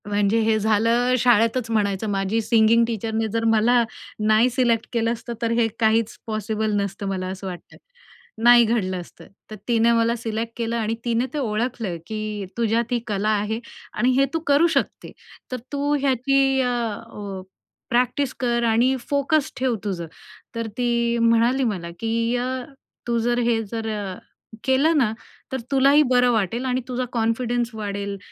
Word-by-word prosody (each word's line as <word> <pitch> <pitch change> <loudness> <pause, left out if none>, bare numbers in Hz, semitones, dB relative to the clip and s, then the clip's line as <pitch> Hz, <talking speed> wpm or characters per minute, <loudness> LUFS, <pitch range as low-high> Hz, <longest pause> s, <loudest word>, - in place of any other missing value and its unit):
म्हणजे 205 +2 +1
हे 220 0 +2
झालं 230 +4 +2
शाळेतच 230 0 +3
म्हणायचं, 205 -1 0
माझ्या 195 +3 0
सिंगिंग 225 +1 +4
टीचरने 225 0 -2
जर 230 +1 -1
मला 225 +2 +4 0.4
नाही 220 +3 +4
सिलेक्ट 240 -2 +1
केलं 230 -1 +1
असतं 235 +1 -7
तर 230 -1 0
हे 230 - +3
काहीच 225 0 +2
पॉसिबल 215 0 -2
नसतं 200 +1 -4
मला 185 -1 -3
असं 190 +1 -6
वाटतं, 180 -2 -9 0.7
नाही 240 0 +8
घडलं 215 -5 0
असतं. 175 - -15 0.2
तर - - -5
तिने 235 -1 +3
मला 230 0 +2
सिलेक्ट 225 0 -4
केलं 230 0 -2
आणि 225 0 -1
तिने 235 +1 +1
ते - - -3
ओळखलं 225 -5 -2
की, 215 -2 -4
"तुझ्यात 230 +1 0
ही 245 - +1
कला 210 0 -1
आहे 215 +1 0 0.3
आणि 245 +4 +2
हे 275 - +5
तू 325 - 0
करू 285 +4 +5
शकते. 275 - -2 0.4
तर 255 - -2
तू 285 0 0
ह्याची 270 0 +2
अ, 250 - +1
अ, 210 -4 -5 0.5
प्रॅक्टिस 250 +2 +1
कर 235 -2 0
आणि 235 +3 +3
फोकस 285 +1 +1
ठेव 255 -2 +1
तुझं." 180 -5 -3 0.5
तर 230 -1 -3
ती 235 -1 +1
म्हणाली 230 +3 +3
मला 190 -8 -2
की, 230 +1 0
"अ, 245 +1 -1 0.6
तू 235 -1 +1
जर 240 +1 +1
हे 225 -1 +2
जर 225 -1 -3
अ, 195 -3 -5 0.5
केलं 280 +5 +3
ना? 235 -6 +2 0.4
तर 265 - -1
तुलाही 275 +2 +5
बरं 250 -1 +4
वाटेल 225 +3 -1
आणि 255 0 0
तुझा 255 0 -2
कॉन्फिडन्स 235 +1 0
वाढेल 200 -1 -4
230 Hz, 160 wpm, -23 LUFS, 215-245 Hz, 0.7 s, नाही